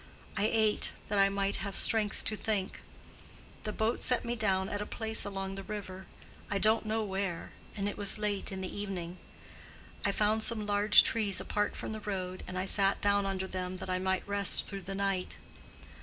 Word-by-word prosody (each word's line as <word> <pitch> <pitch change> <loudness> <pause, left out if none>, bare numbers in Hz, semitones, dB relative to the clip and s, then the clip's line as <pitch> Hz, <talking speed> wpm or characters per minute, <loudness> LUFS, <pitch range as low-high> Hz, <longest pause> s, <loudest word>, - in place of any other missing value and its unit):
I 200 - +1
ate, 220 -2 +3 0.2
that 205 -1 +1
I 195 0 +5
might 195 0 -1
have 200 -1 -5
strength 215 -2 +3
to 215 - 0
think. 205 -3 -2 0.8
The 215 - -2
boat 220 +2 -1
set 250 -1 +3
me 240 0 -2
down 190 -4 +1
at 205 +1 -3
a - - -3
place 220 0 0
along 195 -1 -4
the 195 - -5
river—I 195 0 -7
don't 215 +2 +3
know 220 +1 0
where—and 195 +1 -4
it 205 - -5
was 205 0 +4
late 205 -2 -2
in 190 0 -5
the 185 - -5
evening. 185 -3 -5 0.8
I 200 - +2
found 215 +2 +1
some 220 -1 -1
large 205 +1 +7
trees 205 -4 0
apart 210 0 -1
from - - -5
the 220 - -5
road, 185 -3 -4
and 185 - -5
I 185 - -1
sat 195 0 +3
down 200 -1 +2
under 190 -1 -2
them 185 -1 -4
that 185 0 -6
I 185 - 0
might 190 +1 -1
rest 200 -1 +2
through 195 -1 -6
the 195 +1 -6
night. 195 -2 -2
200 Hz, 190 wpm, -31 LUFS, 190-210 Hz, 0.8 s, large